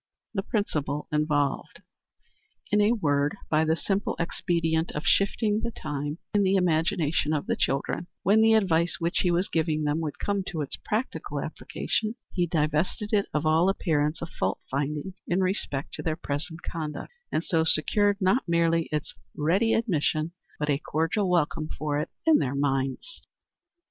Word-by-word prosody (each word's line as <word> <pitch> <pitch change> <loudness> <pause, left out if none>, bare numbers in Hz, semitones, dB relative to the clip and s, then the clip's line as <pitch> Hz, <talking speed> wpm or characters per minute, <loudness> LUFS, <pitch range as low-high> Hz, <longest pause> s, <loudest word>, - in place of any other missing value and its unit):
The 195 - 0
Principle 150 - -2
Involved. 150 -2 0 0.9
In 210 0 +4
a 205 +2 +4
word, 145 -5 +1
by 155 0 +4
the 160 0 +2
simple 195 +4 -1
expedient 165 -1 0
of 150 - -4
shifting 210 +1 +2
the 235 - -1
time, 145 -6 -4 0.2
in 205 - +4
the 195 0 +3
imagination 160 -3 +1
of 150 - -1
the - - 0
children, 140 +5 -1 0.2
when 210 +3 +5
the 225 0 +6
advice 170 -5 +2
which 170 +1 0
he 180 - +2
was 175 +2 +1
giving 155 -1 0
them 150 +1 +1
would 155 -3 -3
come 200 -1 -1
to 165 -5 -3
its 145 - -3
practical 225 +5 -2
application, 220 +1 -2 0.2
he 175 -2 +1
divested 160 +6 0
it 200 -2 +3
of 150 +1 -1
all 160 +4 +4
appearance 155 -5 0
of 170 - -5
fault 95 +1 -1
finding 150 +6 -2
in 180 +2 +1
respect 165 -7 -2
to - - -5
their 160 - -1
present 160 +2 -5
conduct, 155 - -5 0.2
and 160 - 0
so 165 -3 +2
secured 205 +6 +3
not 195 +6 +3
merely 165 -1 +2
its 150 -1 -2 0.2
ready 190 +10 +2
admission, 165 -7 0 0.3
but 150 - -2
a 145 -2 +2
cordial 165 +7 0
welcome 160 -2 +1
for 150 -1 -1
it, 150 - -3 0.2
in 320 -2 +6
their 135 0 -1
minds. 135 - -1
165 Hz, 165 wpm, -27 LUFS, 150-195 Hz, 0.9 s, the